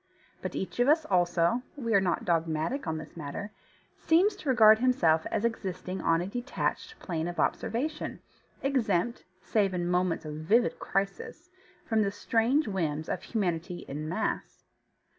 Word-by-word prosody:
But - - -5
each 190 - -4
of 245 - +4
us 310 +2 +4
also 175 +4 +2
(we 230 -5 -2
are 200 - +5
not 180 -3 0
dogmatic 165 - 0
on 160 0 -1
this 155 -1 -9
matter) 170 +7 -6 0.5
seems 375 +6 +3
to 310 -8 -5
regard 220 -4 +7
himself 170 -11 +3
as 220 +1 0
existing 190 -4 -3
on 165 0 +2
a - - -2
detached 245 - -3
plane 165 -3 -3
of 175 - -5
observation, 295 +7 -1 0.4
exempt 235 -5 0 0.2
(save 195 -2 +1
in 175 -1 -1
moments 180 -2 0
of 150 - -5
vivid 220 +10 +2
crisis) 200 - -3 0.3
from 220 -2 +2
the 200 - +2
strange 230 +7 +1
whims 160 -6 -2
of 180 - -2
humanity 175 -5 -2
en 150 +3 -5
masse. 215 +6 -3
195 Hz, 155 wpm, -29 LUFS, 170-240 Hz, 0.5 s, regard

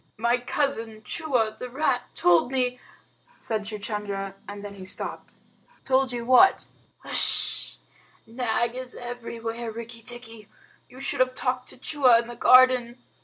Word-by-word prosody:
"My 235 +3 +1
cousin 230 -5 -2
Chua, 240 -6 -1
the 250 - -6
rat, 260 -1 -1
told 175 +7 +3
me 250 -1 -1 0.3
" - - -34
said 215 -2 -4
Chuchundra, 205 -2 -5
and 205 0 -8
then 205 - -7
he 195 -1 -11
stopped. 185 - -3 0.5
"Told 265 0 +1
you 240 -1 -4
what?" 255 +10 +5 0.4
"H'sh! - - +3 0.5
Nag 235 0 -1
is 255 0 -8
everywhere, 235 -1 -6
Rikki 230 +1 -9
tikki. 230 -2 -10 0.4
You 255 - -14
should 275 - 0
have 255 0 +2
talked 255 -1 -2
to - - -14
Chua 255 -3 +4
in 235 - -5
the 240 - -8
garden." 255 0 +5
240 Hz, 145 wpm, -25 LUFS, 220-255 Hz, 0.5 s, what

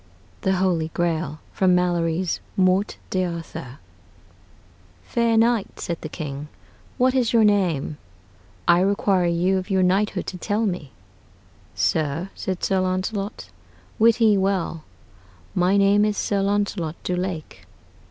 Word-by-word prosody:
THE 190 - +1
HOLY 180 -4 +1
GRAIL 160 -3 -1
From 185 -2 +3
Malory's 175 -1 0 0.2
'Morte 190 +2 +2
d'Arthur' 170 -8 -4 1.3
"Faire 235 -2 +1
knight," 230 -2 +1
said 170 -1 -3
the 155 - -6
King, 150 -2 -6 0.5
"what 255 0 +3
is 250 -3 +1
your 230 -1 +5
name? 175 -8 +1 0.7
I 175 0 +6
require 195 -2 +2
you 180 +3 +2
of 185 - -8
your 190 -1 +2
knighthood 195 +4 +1
to 180 - -6
tell 210 +4 0
me." 175 -8 -3 0.8
"Sir," 160 +5 0
said 185 -2 -4
Sir 190 -1 +2
Launcelot, 185 - -2 0.5
"wit 230 +1 +5
ye 215 -3 +4
well, 190 -4 -1 0.7
my 180 +3 +3
name 200 +1 +4
is 210 -1 0
Sir 200 -1 0
Launcelot 200 -5 -1
du 180 - -1
Lake." 180 -3 -5
185 Hz, 130 wpm, -23 LUFS, 170-205 Hz, 1.3 s, I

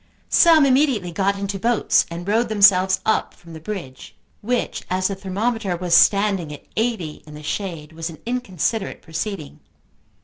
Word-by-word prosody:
Some 320 -4 +6
immediately 260 - +2
got 200 +3 0
into 200 0 -4
boats 235 +2 +2
and 170 +2 -7
rowed 225 +3 +1
themselves 190 -3 +5
up 220 - 0
from 170 -1 -15
the 160 - -8
bridge, 160 -7 -8 0.3
which, 245 +3 -2
as 185 +1 0
the - - -2
thermometer 195 0 -2
was 175 -1 -2
standing 195 -5 +4
at 145 - -10
eighty 220 -9 -2
in 150 - -11
the 150 - -10
shade, 165 -3 -4
was 165 +1 -5
an 160 - -10
inconsiderate 225 -4 -2
proceeding. 160 0 -5
195 Hz, 160 wpm, -21 LUFS, 170-220 Hz, 0.3 s, Some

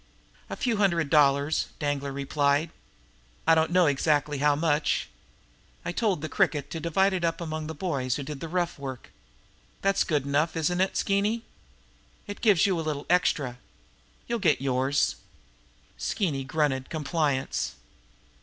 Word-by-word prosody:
"A - - -4
few 235 -4 0
hundred 170 -8 +1
dollars," 145 0 +3
Danglar 145 -2 -2
replied. 140 +3 0 0.7
"I 165 - +6
don't 160 0 +3
know 180 0 +4
exactly 145 0 +1
how 145 0 +3
much. 150 -1 +1 0.8
I - - -1
told 195 -4 0
the - - -1
Cricket 145 -2 0
to 165 - -4
divide 190 +5 +2
it 180 -2 -2
up 165 -1 0
among 155 -2 -4
the 160 - -6
boys 140 -7 -1
who 140 - -4
did 145 0 -6
the 165 - -5
rough 175 -1 -2
work. 130 -3 -7 0.7
That's 195 0 +3
good 150 -5 0
enough, 145 +4 +1
isn't 175 +3 +1
it, 190 - 0
Skeeny? 205 +4 +1 0.8
It 205 - -8
gives 205 -8 +5
you 190 -4 +1
a - - -1
little 150 -2 -3
extra. 140 -8 +1 0.7
You'll 235 0 -1
get 170 -7 +3
yours." 135 +1 +1 0.8
Skeeny 145 -10 -1
grunted 135 -2 0
compliance. 150 -3 -1
155 Hz, 150 wpm, -27 LUFS, 140-175 Hz, 0.8 s, I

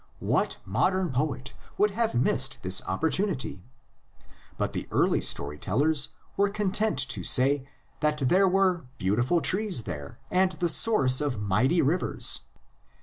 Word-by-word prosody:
What - - -1
modern 175 - 0
poet 130 0 -3 0.2
would 210 0 +2
have 225 - -2
missed 130 +2 +1
the 95 0 +2
opportunity! 150 - -2 1.0
But - - -2
the - - -5
early - - +1
story 75 +1 0
tellers 145 +8 +1 0.3
were 200 0 +1
content 210 +1 -1
to - - -3
say 135 +1 +3 0.3
that 150 0 0
there 190 +7 +3
were 185 -6 +1
beautiful 120 - 0
trees 190 - +1
there, 75 -7 -8
and 185 0 +2
the 175 -2 -2
source 150 - +4
of 140 -7 -2
mighty 120 - +1
rivers. 160 +7 +1
150 Hz, 135 wpm, -26 LUFS, 125-185 Hz, 1.0 s, source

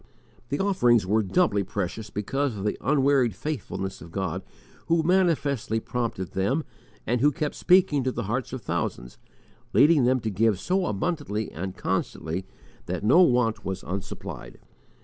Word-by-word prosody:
The 140 - -1
offerings 125 - +3
were 105 +4 +2
doubly 105 - +2
precious 100 +3 -4
because 125 +4 -2
of 95 - -5
the 105 - 0
unwearied 135 -6 +3
faithfulness 95 -8 -4
of 80 +1 -11
God 95 -1 -2 0.5
who 165 -1 +3
manifestly 150 - +1
prompted 115 -6 -3
them, 105 +12 0 0.4
and 120 +1 0
who 145 - +5
kept 150 +2 -2
speaking 180 -7 +3
to 130 - +1
the 120 - -3
hearts 115 +6 -2
of 130 -2 -6
thousands, 75 -7 -3 0.5
leading 150 -4 +5
them 130 +1 +3
to 110 - -2
give 105 0 +2
so 185 - 0
abundantly 110 - -2
and 95 +3 -6
constantly 85 +4 -2 0.4
that - - -3
no 135 +12 +6
want 125 -9 +3
was 95 -1 -4
unsupplied. 95 +1 -6
120 Hz, 150 wpm, -26 LUFS, 95-145 Hz, 0.5 s, no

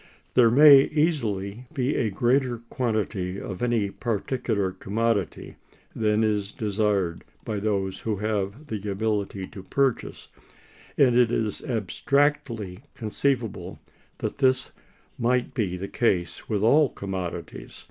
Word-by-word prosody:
There 120 -2 +6
may 140 +2 +8
easily 120 - -1
be 135 -1 -1
a 115 - +1
greater 120 +4 +1
quantity 105 -6 -1
of 95 -2 -6
any 115 -5 +1
particular 110 -2 -1
commodity 100 -1 -2 0.4
than 110 0 +2
is 105 -2 0
desired 105 -5 -1 0.2
by 105 -2 -2
those 100 -2 -1
who 110 -2 -2
have 105 +5 -2
the 105 -6 -5
ability 100 -1 -1
to 95 - -9
purchase, 135 +6 -1 0.7
and 125 -4 +5
it 120 -2 +5
is 110 -3 -1
abstractedly 115 -3 0 0.2
conceivable 110 -5 -2 0.4
that - - -4
this 130 -2 +2 0.5
might 125 +1 +1
be 95 -7 -1
the 95 +2 -5
case 95 -8 -1
with 105 -2 0
all 145 +5 +5
commodities. 95 -3 -6
110 Hz, 120 wpm, -25 LUFS, 100-125 Hz, 0.7 s, may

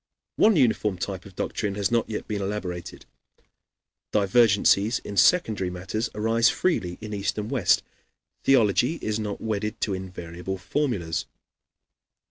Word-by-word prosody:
One 215 -1 +5
uniform 105 - +2
type 95 0 -5
of 95 - -16
doctrine 100 +1 -2
has 100 -1 0
not 115 -1 +1
yet 105 - -4
been 105 -2 -3
elaborated; 95 -4 -5 1.1
divergencies 105 +1 +4
in 100 - -6
secondary 105 - +3
matters 95 +6 -3
arise 115 +3 +3
freely 115 - -1
in 105 -1 -6
East 100 -2 -2
and 105 +1 -4
West; 110 -9 +3 0.6
theology 120 - +3
is 110 -8 -3
not 105 -2 -4
wedded 105 0 -2
to 100 - 0
invariable 90 0 -6
formulas. 90 - -2
105 Hz, 130 wpm, -25 LUFS, 95-115 Hz, 1.1 s, One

